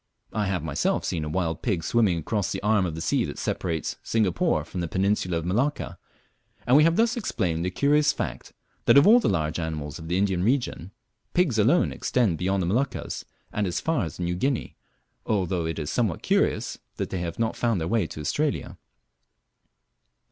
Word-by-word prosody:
I 105 -2 0
have 90 -5 -1
myself 80 -3 0
seen 80 - -2
a 75 - -3
wild 80 0 -1
pig 95 -9 -1
swimming 105 -1 +2
across 100 +4 -1
the - - -4
arm 105 -3 +3
of 80 - -5
the 80 - -5
sea - - +1
that - - -6
separates 80 -3 -2
Singapore 90 -8 +1
from 90 +2 -5
the 85 - -2
Peninsula 95 -1 0
of 80 - -3
Malacca, 120 +11 -1 0.7
and 125 - +4
we 150 - +7
thus 225 +8 +3
have 240 - -3
explained 85 - -1
the 90 - 0
curious 145 +8 +3
fact, - - -5 0.3
that - - +6
of 140 - +7
all 230 +4 +8
the - - +1
large 80 -3 0
mammals 75 -2 -4
of 80 - -8
the 90 +2 0
Indian 95 -2 +1
region, 120 - 0 0.5
pigs 165 -11 +2
alone 135 +12 +4
extend 110 -10 0
beyond 95 +1 0
the - - 0
Moluccas 120 +10 -2 0.3
and 105 -1 0
as 90 - -1
far 160 -8 0
as 80 0 -6
New 90 0 -1
Guinea, 130 +9 -1 0.5
although 90 -5 0
it 80 - -3
is 75 -2 -3
somewhat 110 -9 0
curious - - +1 0.2
that - - -4
they 95 - -2
have 85 -1 -4
not 115 -1 0
found 115 -5 +1
their 80 - -2
way 110 -5 +1
to - - -9
Australia. 145 - -2
95 Hz, 195 wpm, -26 LUFS, 85-120 Hz, 0.7 s, all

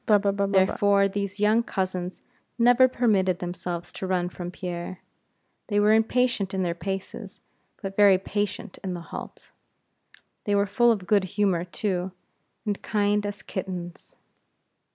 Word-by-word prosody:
Therefore, 200 +1 +3
these 200 0 -4
young 215 +2 +4
cousins 185 -4 -3 0.3
never 245 +2 +6
permitted 205 -8 +2
themselves 175 -1 -5
to 190 - -5
run 180 -1 0
from 175 0 -6
Pierre; 180 0 -6 0.7
they 205 -2 +1
were 210 +1 +5
impatient 225 -3 +1
in 190 - 0
their 170 -1 0
paces, 195 +2 -6 0.4
but 195 0 -4
very 200 -2 +6
patient 205 0 -4
in 185 -2 -3
the 175 - -6
halt. - - -8 0.9
They 205 - +1
were 200 0 +3
full 235 +4 +3
of 200 -5 -1
good 200 0 +3
humor 190 -5 +2
too, 185 0 -2 0.5
and 205 -2 -2
kind 205 -1 +1
as 205 0 -7
kittens. 180 -2 -6
195 Hz, 135 wpm, -26 LUFS, 180-205 Hz, 0.9 s, never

